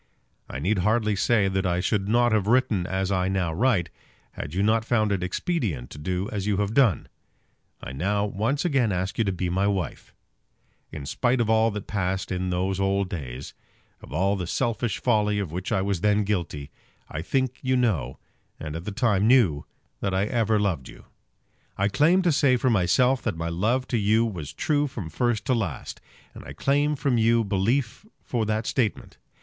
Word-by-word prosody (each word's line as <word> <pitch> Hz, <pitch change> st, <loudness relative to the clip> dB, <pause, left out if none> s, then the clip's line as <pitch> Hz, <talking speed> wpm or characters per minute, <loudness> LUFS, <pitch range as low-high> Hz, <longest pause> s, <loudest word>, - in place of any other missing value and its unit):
I -, -, -5 dB
need 95 Hz, +8 st, 0 dB
hardly 110 Hz, +2 st, +1 dB
say 100 Hz, +1 st, +2 dB
that 95 Hz, 0 st, 0 dB
I 90 Hz, 0 st, 0 dB
should 100 Hz, +1 st, 0 dB
not 120 Hz, +1 st, +3 dB
have 105 Hz, -2 st, +1 dB
written 110 Hz, -6 st, +2 dB
as 95 Hz, +1 st, -1 dB
I 95 Hz, -1 st, +1 dB
now 95 Hz, -4 st, -1 dB
write, 100 Hz, -4 st, +1 dB, 0.4 s
had 75 Hz, -, -7 dB
you 95 Hz, -, +1 dB
not 110 Hz, +1 st, +2 dB
found 110 Hz, -2 st, +1 dB
it 100 Hz, -2 st, 0 dB
expedient 90 Hz, -, -2 dB
to 75 Hz, -, -9 dB
do 90 Hz, +5 st, -2 dB
as 100 Hz, -1 st, -3 dB
you 100 Hz, -2 st, +1 dB
have 105 Hz, +1 st, -1 dB
done. 115 Hz, -, +3 dB, 0.8 s
I -, -, -6 dB
now 100 Hz, +9 st, 0 dB
once 110 Hz, -, -1 dB
again 135 Hz, -10 st, +2 dB
ask 95 Hz, +3 st, -2 dB
you -, -, +4 dB
to 100 Hz, -, +1 dB
be 90 Hz, 0 st, -2 dB
my 95 Hz, +3 st, +1 dB
wife. 95 Hz, -6 st, -3 dB, 0.8 s
In 75 Hz, -3 st, -7 dB
spite 125 Hz, -, 0 dB
of 115 Hz, -2 st, +1 dB
all 110 Hz, 0 st, +4 dB
that 105 Hz, -2 st, -5 dB
passed 95 Hz, -2 st, -2 dB
in 90 Hz, 0 st, -2 dB
those 95 Hz, +2 st, -1 dB
old 95 Hz, 0 st, +1 dB
days, 70 Hz, -6 st, -6 dB, 0.5 s
of -, -, -13 dB
all 100 Hz, +2 st, +1 dB
the 90 Hz, -3 st, -4 dB
selfish 115 Hz, -1 st, -1 dB
folly 105 Hz, -4 st, +2 dB
of 100 Hz, -6 st, -3 dB
which 90 Hz, +2 st, -4 dB
I 95 Hz, -, +1 dB
was 100 Hz, -3 st, -1 dB
then 105 Hz, 0 st, +3 dB
guilty, 85 Hz, -8 st, -3 dB, 0.4 s
I 80 Hz, -, -5 dB
think 130 Hz, +7 st, -1 dB
you 130 Hz, 0 st, +1 dB
know, 85 Hz, -, 0 dB, 0.4 s
and 75 Hz, -1 st, -6 dB
at 85 Hz, +2 st, -6 dB
the 105 Hz, -, -3 dB
time 105 Hz, -2 st, +2 dB
knew, 110 Hz, -, +3 dB, 0.3 s
that 95 Hz, -1 st, -1 dB
I 95 Hz, +2 st, +2 dB
ever 110 Hz, -2 st, +1 dB
loved 90 Hz, -10 st, -1 dB
you. -, -, -14 dB, 0.7 s
I 100 Hz, +1 st, +1 dB
claim 165 Hz, -, +3 dB
to 175 Hz, -, +3 dB
say 140 Hz, -3 st, +3 dB
for 130 Hz, 0 st, +1 dB
myself 125 Hz, +6 st, +3 dB
that -, -, -2 dB
my 85 Hz, 0 st, -3 dB
love 115 Hz, +10 st, 0 dB
to 120 Hz, -, +1 dB
you 110 Hz, +3 st, +3 dB
was 85 Hz, -10 st, -5 dB
true 145 Hz, -, 0 dB
from 100 Hz, -, -7 dB
first 120 Hz, -, 0 dB
to 130 Hz, -, +2 dB
last, 100 Hz, -, -3 dB, 0.3 s
and -, -, -11 dB
I 70 Hz, -, -9 dB
claim 145 Hz, -, +1 dB
from 130 Hz, -4 st, +1 dB
you 115 Hz, +1 st, +3 dB
belief 110 Hz, -, 0 dB, 0.2 s
for 115 Hz, -4 st, -2 dB
that 110 Hz, +1 st, -1 dB
statement. 115 Hz, -5 st, -2 dB
100 Hz, 200 wpm, -25 LUFS, 90-120 Hz, 0.8 s, you